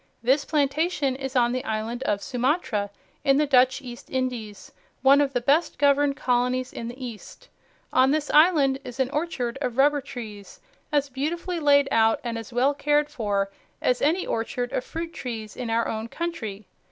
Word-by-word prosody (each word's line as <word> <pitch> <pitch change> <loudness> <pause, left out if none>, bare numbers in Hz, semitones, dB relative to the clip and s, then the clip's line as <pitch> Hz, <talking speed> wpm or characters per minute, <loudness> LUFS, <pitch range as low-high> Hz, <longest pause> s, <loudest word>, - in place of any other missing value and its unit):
This 265 +4 +3
plantation 290 -1 0
is 270 0 -6
on 240 -1 +3
the 255 0 -2
island 220 +3 -3
of 200 -1 0
Sumatra 250 - 0 0.3
in 275 0 +4
the 300 - +3
Dutch 260 0 +3
East 240 -2 -10
Indies, 245 -6 -4 0.3
one 275 +2 +6
of 280 -2 +1
the 245 - 0
best 290 +7 +2
governed 285 0 +3
colonies 250 +1 0
in 230 - -5
the 240 +1 -7
East. 230 -4 -10 0.4
On 260 +1 +5
this 295 +1 0
island 295 -4 +5
is 245 +1 -9
an 265 0 +1
orchard 270 -6 -2
of 250 -3 -2
rubber 290 +1 +4
trees, 220 -7 -9 0.3
as 285 -1 +1
beautifully 335 +6 -3
laid 285 -2 +4
out 225 0 +3
and 235 -1 -3
as 225 -1 -7
well 255 +4 +2
cared 295 +1 +1
for 200 -3 -1 0.3
as 250 - +1
any 330 +6 +2
orchard 245 +2 -2
of - - -1
fruit 330 +3 -6
trees 225 -4 -6
in 245 -2 -5
our 230 +1 +1
own 220 +1 -3
country. 230 - -5
260 Hz, 175 wpm, -25 LUFS, 235-290 Hz, 0.4 s, one